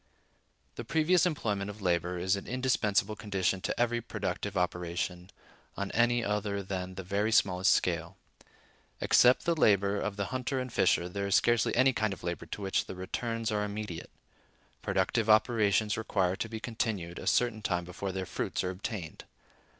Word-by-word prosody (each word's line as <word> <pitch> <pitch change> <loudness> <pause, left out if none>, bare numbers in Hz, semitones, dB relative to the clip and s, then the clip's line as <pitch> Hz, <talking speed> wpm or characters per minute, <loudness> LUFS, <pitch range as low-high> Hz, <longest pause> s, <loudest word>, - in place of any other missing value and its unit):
The 120 - -4
previous 160 +7 +3
employment 105 - -2
of 105 +1 -8
labor 90 -1 0
is 95 +2 +1
an 100 - -7
indispensable 110 -4 +1
condition 95 -3 -1
to - - -3
every 120 0 +1
productive 100 -2 -4
operation, 90 0 -2 0.5
on 100 0 -3
any 120 0 +2
other 105 -1 -1
than 95 -1 -4
the 95 - -6
very 100 +4 0
smallest 95 -4 +3
scale. 85 +1 0 0.8
Except 125 +1 +5
the 170 - +3
labor 100 - +3
of 105 - -3
the 100 0 -2
hunter 130 +1 -1
and 125 -2 -5
fisher, 90 -1 +3
there 100 +2 -3
is 100 - +2
scarcely 120 -1 +3
any 130 +2 +4
kind 110 -3 0
of - - -11
labor 85 0 -4
to 105 - -6
which 95 - 0
the - - -6
returns 115 +5 -3
are 105 -1 0
immediate. 105 -4 -5 0.7
Productive 115 -1 0
operations 110 -1 +3
require 95 -4 0
to 115 - -4
be 110 0 -5
continued 110 -7 -3
a - - -7
certain 115 +1 +2
time 90 -4 -1
before 95 +2 -5
their 95 0 -3
fruits - - -3
are 90 - -1
obtained. 95 -2 -6
100 Hz, 170 wpm, -30 LUFS, 95-115 Hz, 0.8 s, Except